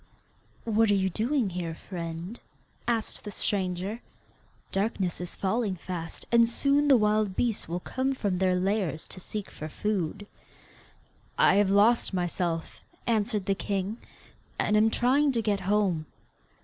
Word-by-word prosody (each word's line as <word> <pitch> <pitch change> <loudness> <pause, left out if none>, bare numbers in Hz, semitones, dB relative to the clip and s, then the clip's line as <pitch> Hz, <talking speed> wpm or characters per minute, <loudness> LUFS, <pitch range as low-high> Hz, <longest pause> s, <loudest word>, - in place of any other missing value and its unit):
'What 225 -1 +3
are 205 - +4
you 190 -1 +1
doing 230 - 0
here, 170 -2 -4
friend?' 170 +4 -6 0.5
asked 230 -2 -1
the - - -6
stranger; 195 +1 -1 0.7
'darkness 195 -3 -1
is 175 - -4
falling 205 0 0
fast, 170 -2 -5
and 235 -1 +5
soon 280 +4 +2
the 275 -3 +7
wild 210 -2 +2
beasts 230 -7 -1
will 175 +2 -2
come 265 +5 -1
from 200 -7 -1
their 185 -1 +3
lairs 185 -3 0
to - - -7
seek 205 +2 -6
for 155 - -7
food.' 205 +1 -2 1.1
'I - - +6
have 205 -1 +4
lost 205 +1 +4
myself,' 175 -2 -2 0.3
answered 215 -3 0
the 195 - +2
king, 195 +2 -2 0.6
'and 210 - +2
am 215 +1 +5
trying 270 +6 +3
to 230 - +1
get 205 -2 +1
home. 190 -7 +1
205 Hz, 145 wpm, -28 LUFS, 180-225 Hz, 1.1 s, the